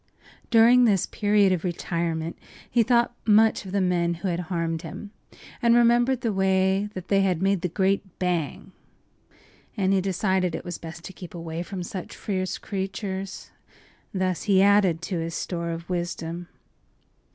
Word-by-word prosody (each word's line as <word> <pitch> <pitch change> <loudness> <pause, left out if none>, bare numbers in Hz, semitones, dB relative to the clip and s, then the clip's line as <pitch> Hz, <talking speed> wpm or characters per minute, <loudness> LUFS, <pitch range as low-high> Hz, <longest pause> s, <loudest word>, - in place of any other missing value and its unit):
During 240 +2 +6
this 200 -5 +3
period 205 -2 +2
of 180 -3 0
retirement 170 -2 -2 0.3
he 240 - +2
thought 235 +1 +2
much 220 -1 +4
of - - -7
the 200 - +1
men 175 -2 +1
who 185 +3 -3
had 170 -1 -1
harmed 165 -2 -1
him, 190 +5 -8 0.5
and 235 -1 +5
remembered 240 +2 +4
the 225 -3 0
way 190 +1 +2
they 190 +2 +1
had 185 -4 +1
made 195 0 +1
the 180 - 0
great 190 +1 0
“bang!” 175 -5 -2 1.1
And 195 -1 +2
he 190 - +3
decided 185 -2 0
it - - -6
was 175 -1 -5
best 165 0 -9
to 190 - -8
keep 180 -1 -10
away 165 0 -5
from 180 0 -5
such 180 +1 -7
fierce 185 -2 -2
creatures. 195 0 -5 0.6
Thus 185 -2 -1
he 195 -1 +5
added 195 -5 +4
to 175 -1 -2
his 165 0 -4
store 170 -2 -3
of 165 0 -5
wisdom. 175 -1 -4
190 Hz, 160 wpm, -25 LUFS, 170-200 Hz, 1.1 s, During